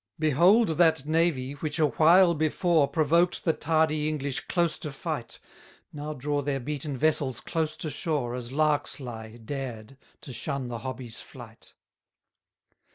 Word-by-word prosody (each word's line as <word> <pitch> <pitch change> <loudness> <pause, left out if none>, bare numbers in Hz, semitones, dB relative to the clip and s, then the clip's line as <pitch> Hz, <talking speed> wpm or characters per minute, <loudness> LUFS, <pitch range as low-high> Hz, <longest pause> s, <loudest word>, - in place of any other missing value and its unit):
195 - - -34
Behold 165 - +4
that 160 -5 +4
navy, 155 -4 +1
which 150 +2 -3
a 160 - +4
while 170 +4 +5
before, 160 0 +2
Provoked 170 +3 +2
the 165 - +3
tardy 155 -1 +1
English 140 -3 -2
close 170 -3 0
to 150 - -5
fight, 135 - -5 0.5
Now 150 0 -5
draw 145 +2 -1
their 140 -1 -2
beaten 145 +1 -4
vessels 140 -3 +1
close 160 -2 -2
to 155 - -4
shore, 145 -5 -2
As 125 -1 -5
larks 150 0 +1
lie, 115 -3 -8
dared, 120 -1 -6 0.2
to 130 - -9
shun 135 +1 -3
the 120 -1 -5
hobby's 125 -2 -6
flight. - - -13
150 Hz, 150 wpm, -27 LUFS, 130-160 Hz, 0.5 s, while